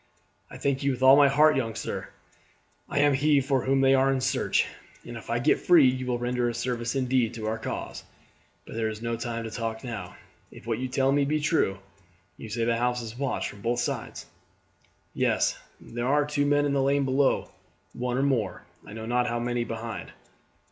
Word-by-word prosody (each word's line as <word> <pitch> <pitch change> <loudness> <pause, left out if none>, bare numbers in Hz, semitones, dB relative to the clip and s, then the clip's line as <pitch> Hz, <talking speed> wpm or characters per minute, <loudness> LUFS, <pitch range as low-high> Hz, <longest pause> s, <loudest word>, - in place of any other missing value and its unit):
"I - - -10
thank 140 -1 -1
you 140 - +1
with 130 -1 -2
all 130 +1 +9
my 145 0 +6
heart, 150 +2 +5
young 115 -4 -2
sir. - - -4 0.8
I - - -3
am 145 -1 +4
he 145 +1 +3
for 135 -1 0
whom 135 0 +2
they 135 0 +5
are 135 0 +4
in 135 - 0
search, 130 +1 +1 0.4
and 120 - -8
if 115 - -10
I 115 - +1
get 120 - +2
free 170 -7 +6
you 130 0 -1
will 125 -1 0
render 120 0 -1
a 120 - -4
service 120 0 -2
indeed 125 -3 +1
to 110 -2 -5
our 110 +1 -2
cause; - - -5 0.6
but - - -10
there 110 -1 -1
is 110 +1 -7
no 115 0 -1
time 115 0 -4
to 110 - -6
talk 115 +1 -4
now, 110 -8 -6 0.3
if - - -14
what 115 -1 -2
you 130 - -2
tell 135 +1 +1
me 140 0 +3
be 150 +2 0
true. 145 -10 +1 0.6
You 110 - -10
say 115 +2 -1
the 115 0 +1
house 125 0 0
is 110 0 -8
watched 140 -2 -1
from 100 - -14
both 120 +3 0
sides?" 120 - -4 0.9
"Yes; - - +1 0.2
there 120 +1 -5
are 145 +2 +3
two 145 -1 0
men 145 0 +3
in 145 - 0
the 140 - +2
lane 140 +1 +2
below, 135 +1 +1 0.4
one 125 0 -2
or 135 - +1
more, 115 -10 -1 0.2
I - - -11
know 110 0 -6
not 120 +1 +1
how 120 0 -1
many, 120 0 -1
behind." 115 -1 -6
125 Hz, 215 wpm, -27 LUFS, 115-135 Hz, 0.9 s, all